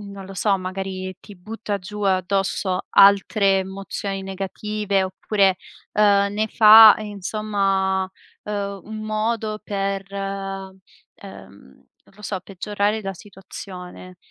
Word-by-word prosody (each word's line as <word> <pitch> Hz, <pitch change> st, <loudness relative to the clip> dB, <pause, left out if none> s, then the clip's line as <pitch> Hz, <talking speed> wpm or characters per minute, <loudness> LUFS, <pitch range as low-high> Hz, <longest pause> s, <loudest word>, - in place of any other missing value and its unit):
non 200 Hz, -1 st, -9 dB
lo 195 Hz, -, -10 dB
so, 195 Hz, 0 st, +1 dB
magari 185 Hz, 0 st, -5 dB
ti 205 Hz, -, -13 dB
butta 210 Hz, +2 st, -5 dB
giù 210 Hz, +3 st, -8 dB
addosso 190 Hz, 0 st, 0 dB
altre 200 Hz, 0 st, +5 dB
emozioni 195 Hz, 0 st, -5 dB
negative 195 Hz, +1 st, -2 dB
oppure, 190 Hz, 0 st, +1 dB, 0.4 s
uhm, 200 Hz, -1 st, +3 dB
ne 215 Hz, +1 st, 0 dB
fa 220 Hz, 0 st, +9 dB
insomma, 200 Hz, -2 st, -1 dB, 0.4 s
uhm, 200 Hz, -2 st, -4 dB
un 220 Hz, +1 st, -8 dB
modo 215 Hz, 0 st, -2 dB
per 195 Hz, -1 st, -2 dB, 1.2 s
ehm, 100 Hz, -, -14 dB, 0.2 s
non -, -, -25 dB
lo 210 Hz, -, -15 dB
so, 195 Hz, -2 st, -3 dB
peggiorare 205 Hz, +3 st, -2 dB
la 195 Hz, -1 st, -4 dB
situazione. 185 Hz, -1 st, -11 dB
195 Hz, 115 wpm, -22 LUFS, 190-210 Hz, 1.2 s, fa